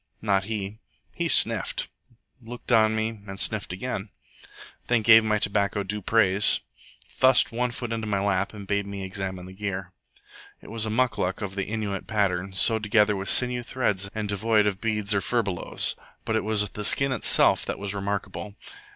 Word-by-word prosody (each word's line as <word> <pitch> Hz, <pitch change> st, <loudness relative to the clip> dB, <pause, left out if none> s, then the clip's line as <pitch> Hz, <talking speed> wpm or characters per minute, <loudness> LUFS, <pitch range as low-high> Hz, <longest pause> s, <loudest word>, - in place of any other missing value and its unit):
Not 100 Hz, -3 st, +1 dB
he. 105 Hz, 0 st, -5 dB, 0.3 s
He -, -, -1 dB
sniffed, -, -, +2 dB, 0.5 s
looked 120 Hz, +2 st, -8 dB
on 110 Hz, -1 st, +4 dB
me, 110 Hz, 0 st, -2 dB
and 95 Hz, 0 st, -7 dB
sniffed 110 Hz, -3 st, -2 dB
again; 100 Hz, +1 st, -4 dB, 0.8 s
then 120 Hz, -2 st, +2 dB
gave 115 Hz, 0 st, +8 dB
my 105 Hz, -1 st, +1 dB
tobacco 100 Hz, 0 st, 0 dB
due 105 Hz, +2 st, -3 dB
praise, 100 Hz, -1 st, +3 dB, 0.5 s
thrust 130 Hz, 0 st, +3 dB
one 125 Hz, +2 st, -1 dB
foot 120 Hz, -1 st, -5 dB
into 110 Hz, -1 st, -3 dB
my 100 Hz, -2 st, 0 dB
lap, 100 Hz, -1 st, 0 dB
and 105 Hz, -2 st, -9 dB
bade 100 Hz, 0 st, -1 dB
me 100 Hz, -1 st, -6 dB
examine 95 Hz, -1 st, -5 dB
the 95 Hz, -, -11 dB
gear. 95 Hz, -2 st, -5 dB, 0.7 s
It -, -, -13 dB
was 110 Hz, -1 st, -1 dB
a -, -, -2 dB
MUCLUC 110 Hz, -5 st, 0 dB
of 100 Hz, -1 st, -4 dB
the 95 Hz, -1 st, -3 dB
Innuit 105 Hz, -3 st, -3 dB
pattern, 100 Hz, -3 st, 0 dB
sewed 110 Hz, +4 st, +3 dB
together 105 Hz, 0 st, +3 dB
with 95 Hz, -1 st, -3 dB
sinew 125 Hz, -1 st, +3 dB
threads, 105 Hz, -6 st, -1 dB
and 110 Hz, -1 st, -3 dB
devoid 105 Hz, +1 st, +2 dB
of 100 Hz, -2 st, -1 dB
beads 105 Hz, -2 st, 0 dB
or 100 Hz, -, +1 dB
furbelows. 100 Hz, -5 st, -1 dB, 0.3 s
But 110 Hz, -, -1 dB
it 110 Hz, -, 0 dB
was 105 Hz, -1 st, +1 dB
the 105 Hz, -, -6 dB
skin 135 Hz, +6 st, +3 dB
itself 130 Hz, -, +4 dB
that -, -, -4 dB
was 100 Hz, 0 st, -3 dB
remarkable. 100 Hz, 0 st, -4 dB
105 Hz, 175 wpm, -25 LUFS, 100-110 Hz, 0.8 s, gave